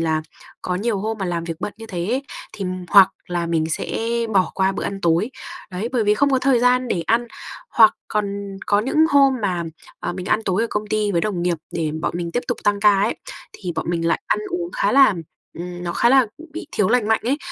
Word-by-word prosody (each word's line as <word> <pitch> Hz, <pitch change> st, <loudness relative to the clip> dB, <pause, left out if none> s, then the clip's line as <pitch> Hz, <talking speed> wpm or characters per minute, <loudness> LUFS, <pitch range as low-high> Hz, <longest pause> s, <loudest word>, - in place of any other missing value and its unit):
là 160 Hz, -1 st, 0 dB, 0.4 s
có 180 Hz, -, -2 dB
nhiều 205 Hz, +2 st, -1 dB
hôm 220 Hz, +2 st, -3 dB
mà 190 Hz, -, -1 dB
làm 170 Hz, -1 st, -2 dB
việc 165 Hz, -1 st, -5 dB
bận 205 Hz, -, -3 dB
như 225 Hz, 0 st, -10 dB
thế 175 Hz, -4 st, -4 dB
ấy, 255 Hz, +5 st, 0 dB, 0.3 s
thì 195 Hz, -, -5 dB, 0.2 s
hoặc 195 Hz, -2 st, +8 dB, 0.2 s
là 175 Hz, -1 st, -2 dB
mình 165 Hz, -2 st, +1 dB
sẽ -, -, -2 dB, 0.3 s
bỏ 190 Hz, -2 st, +3 dB
qua 190 Hz, 0 st, +2 dB
bữa -, -, -4 dB
ăn 195 Hz, -1 st, -4 dB
tối, 175 Hz, +7 st, +2 dB, 0.4 s
đấy, 190 Hz, +6 st, -3 dB
bởi 235 Hz, -4 st, +1 dB
vì 210 Hz, +1 st, +4 dB
không 280 Hz, +4 st, +2 dB
có 265 Hz, -, +3 dB
thời 255 Hz, -2 st, +3 dB
gian 250 Hz, 0 st, +3 dB
để 170 Hz, -, -1 dB
ăn. 240 Hz, +1 st, +2 dB, 0.4 s
Hoặc 220 Hz, -2 st, +6 dB
còn 200 Hz, -1 st, -3 dB
có 205 Hz, 0 st, +3 dB
những 265 Hz, +7 st, -3 dB
hôm 275 Hz, -2 st, +5 dB
mà, 180 Hz, -3 st, 0 dB, 0.4 s
ờ, 175 Hz, -, -3 dB
mình 185 Hz, +1 st, -6 dB
ăn 220 Hz, -, +1 dB
tối 190 Hz, +4 st, +1 dB
ở -, -, +1 dB
công 210 Hz, 0 st, -2 dB
ty 210 Hz, -1 st, 0 dB
với 170 Hz, -, +2 dB
đồng 185 Hz, -4 st, -2 dB
nghiệp 175 Hz, -1 st, +1 dB, 0.2 s
để 160 Hz, -2 st, -1 dB
bọn -, -, 0 dB
mình 170 Hz, -1 st, -3 dB
tiếp 245 Hz, -, 0 dB
tục -, -, -1 dB
tăng 205 Hz, -1 st, +2 dB
ca 205 Hz, -2 st, +5 dB
ấy, -, -, +1 dB, 0.4 s
thì 180 Hz, -3 st, -5 dB
bọn 160 Hz, -, -3 dB
mình 165 Hz, -1 st, -1 dB
lại -, -, +1 dB
ăn -, -, +1 dB
uống 355 Hz, -1 st, -3 dB
khá -, -, +1 dB
là, 270 Hz, -7 st, +6 dB, 0.4 s
ừm, 175 Hz, 0 st, -6 dB
nó 170 Hz, -, -2 dB
khá 235 Hz, -, +3 dB
là 265 Hz, -2 st, +5 dB
b -, -, -11 dB
bị 325 Hz, -1 st, -6 dB
thiếu 200 Hz, -3 st, +1 dB
lành 235 Hz, -2 st, +2 dB
mạnh 220 Hz, -, +3 dB
ấy. 275 Hz, +5 st, +1 dB
205 Hz, 245 wpm, -21 LUFS, 175-235 Hz, 0.4 s, hoặc